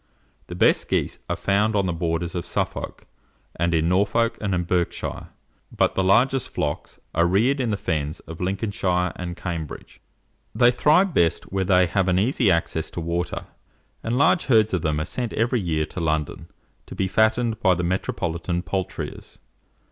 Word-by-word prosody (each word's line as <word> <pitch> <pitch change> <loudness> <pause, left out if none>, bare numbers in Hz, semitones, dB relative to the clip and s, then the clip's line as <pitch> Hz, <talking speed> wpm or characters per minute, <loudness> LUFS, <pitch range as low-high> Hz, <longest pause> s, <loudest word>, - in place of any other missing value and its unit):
The - - -7
best - - +3
geese - - -1
are - - 0
found 105 +2 +1
on 100 -2 +2
the 90 - -1
borders 85 0 -2
of 85 -2 -4
Suffolk, - - -3 0.5
and 85 +1 0
in 80 -1 +2
Norfolk 100 +6 +2
and 95 -4 -1
Berkshire; 90 0 -2 0.4
but - - +1
the 95 - 0
largest 125 +7 +3
flocks 75 0 -4 0.2
are 85 +1 +3
reared 115 +10 +2
in 125 -3 0
the 105 - 0
fens 75 -5 -2
of 80 +1 -10
Lincolnshire 90 -2 -1
and 85 -1 -6
Cambridge. 85 -5 -6 0.5
They 120 +1 +5
thrive 160 +9 +3
best 85 - +1
where 95 0 0
they 90 -1 +4
have 95 +2 0
an 90 -1 +2
easy 115 +2 +2
access 85 -2 0
to - - -6
water, 85 +1 -3 0.6
and 115 +2 -1
large 175 +5 +3
herds 110 -5 +4
of 90 - +1
them 75 -1 0
are 75 - -2
sent 120 +5 -4
every 120 +1 +1
year 80 -4 0
to - - -7
London, 80 -2 -2 0.4
to - - -9
be 95 - 0
fattened 110 +3 +2
by 95 -3 +3
the 90 - -2
metropolitan 85 -1 -2
poulterers. 95 +2 -5
90 Hz, 170 wpm, -23 LUFS, 85-110 Hz, 0.6 s, They